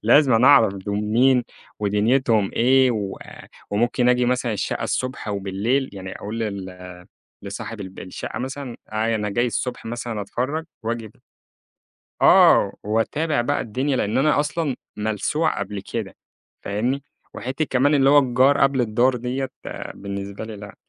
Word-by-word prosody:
لازمًا 125 0 +5
أعرف 115 -8 +6
دول 100 +1 -4
مين 125 +4 +3 0.4
ودنيتهم 105 +1 +2
إيه، 130 +2 +4
وآآ 100 -4 -6 0.2
وممكن 120 +4 +1
آجي 125 0 +3
مثلًا 125 -2 0
الشقة 105 - -2
الصبح 130 -4 -3
وبالليل، 100 +7 -1
يعني 95 -1 -7
أقول 110 +3 -5
لل 95 -4 -5 0.5
لصاحب 100 +2 -6
الب 95 0 -9
الشقة 90 - -6
مثلًا، 130 -1 -5 0.2
أنا 110 -1 0
جاي 120 +5 +1
الصبح 120 +2 -3
مثلًا 115 -2 -4
أتفرَّج 130 +10 -3 0.2
وآجي 115 0 -3
ب - - -21 1.1
آه، - - +6
وأتابع 130 +7 0
بقى - - 0
الدنيا، 130 +5 -1
لأن 105 +2 0
أنا 145 +1 +3
أصلًا 150 -2 -1 0.2
ملسوع 110 +10 0
قبل 100 0 -4
كده 110 -5 -3 0.5
فاهمني؟ 125 +7 -1 0.3
وحتِّة 135 +5 -3
كمان 140 +3 +2
اللي 135 -1 +4
هو 145 0 +7
الجار 130 +2 +3
قبل 135 -2 +3
الدّار 120 +3 +2
ديَّة، 125 +2 -3 0.5
بالنسبة 100 +1 -6
لي 110 -1 -7
لأ. 100 -1 -10
120 Hz, 140 wpm, -22 LUFS, 105-130 Hz, 1.1 s, هو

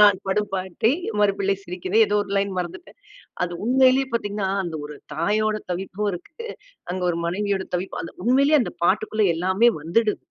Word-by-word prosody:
நான் 205 -2 +7
படும் 205 +1 0
பாட்டை 190 +6 0 0.3
மறு 205 -1 +4
பிள்ளை 195 0 +2
சிரிக்கிறது 185 +4 0
ஏதோ 210 - +1
ஒரு 200 - -11
லைன் 200 0 +1
மறந்துட்டேன். 180 - -6 0.5
அது 175 - -5
உண்மையிலே 260 +1 +5
பாத்தீங்கன்னா, 205 -3 -1 0.2
அந்த 165 -2 -5
ஒரு 150 - -9 0.2
தாயோட 215 +6 +1 0.2
தவிப்பும் 195 +3 -3
இருக்கு. 175 - -9 0.6
அங்க 185 0 -3
ஒரு 170 - -2
மனைவியோட 195 +1 -1
தவிப்பு 185 +2 -4
அந்த - - -9
உண்மையிலே 280 +5 +5
அந்த - - -5
பாட்டுக்குள்ள 215 +2 +2
எல்லாமே 190 +7 +3
வந்துடுது. 210 +6 +1
200 Hz, 165 wpm, -23 LUFS, 185-215 Hz, 0.6 s, நான்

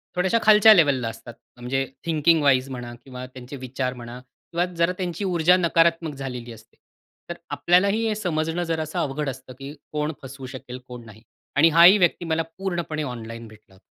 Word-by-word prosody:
थोड्याशा 180 +5 +2
खालच्या 215 0 +8
लेव्हलला 140 - +3
असतात. 115 +1 -11 0.2
म्हणजे 130 +2 -2 0.2
थिंकिंग 160 0 +3
वाईज 135 -1 +3
म्हणा 125 -2 -7
किंवा 125 -1 -8
त्यांचे 130 +1 -10
विचार 130 0 -4
म्हणा 120 0 -9
किंवा 155 +7 -5
जरा 170 +1 +2
त्यांची 180 +1 -3
ऊर्जा 180 -1 +3
नकारात्मक 165 -2 +2
झालेली 125 -3 -6
असते. 110 - -18 0.5
तर 170 - -4 0.2
आपल्यालाही 200 +6 +2
हे 215 - 0
समजणं 165 -3 -2
जरासा 160 -2 -3
अवघड 145 +1 -2
असतं, 130 -1 -9
की 135 +1 -8 0.2
कोण 150 0 -2
फसवू 135 0 -9
शकेल 125 -1 -9
कोण 125 -2 -10
नाही 110 -1 -14 0.3
आणि 150 +4 +6
हाही 170 +5 +7
व्यक्ती 175 -2 +1
मला 165 0 0 0.2
पूर्णपणे 175 -5 -3
ऑनलाईन 115 -3 -7
भेटला 110 -2 -18
होता. 95 - -21
150 Hz, 170 wpm, -23 LUFS, 125-170 Hz, 0.5 s, खालच्या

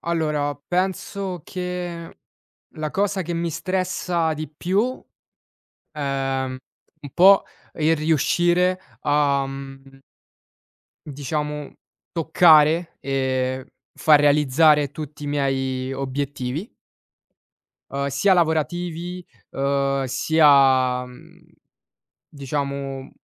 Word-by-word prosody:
Allora, 150 -4 -1
penso 185 +4 -3
che 180 -2 -6 0.5
la 155 -1 -5
cosa 200 -1 0
che 175 -1 -4
mi 170 0 -1
stressa 180 -2 -1
di 155 0 -5
più, 195 - -1 0.9
ehm, 135 -3 -2 0.4
un 145 - -9
po' 195 +2 +6 0.3
il 160 +1 +2
riuscire 175 +4 +2 0.2
a, 145 -1 +2
mhmm 135 0 -10 1.1
diciamo 150 +1 -4 0.4
toccare, 160 0 +4
ehm, 130 -1 -1 0.3
far 155 -2 +5
realizzare 145 0 +4
tutti 150 0 -8
i 145 - -4
miei 135 -2 -1
obiettivi 135 - -4 1.2
uhm, 140 0 -2
sia 140 +9 +2
lavorativi, 175 +2 -1 0.3
uhm, 140 0 0
sia, 135 -3 +4
mhmm, 125 0 -16 0.9
diciamo 140 -1 -4
150 Hz, 85 wpm, -22 LUFS, 135-170 Hz, 1.2 s, po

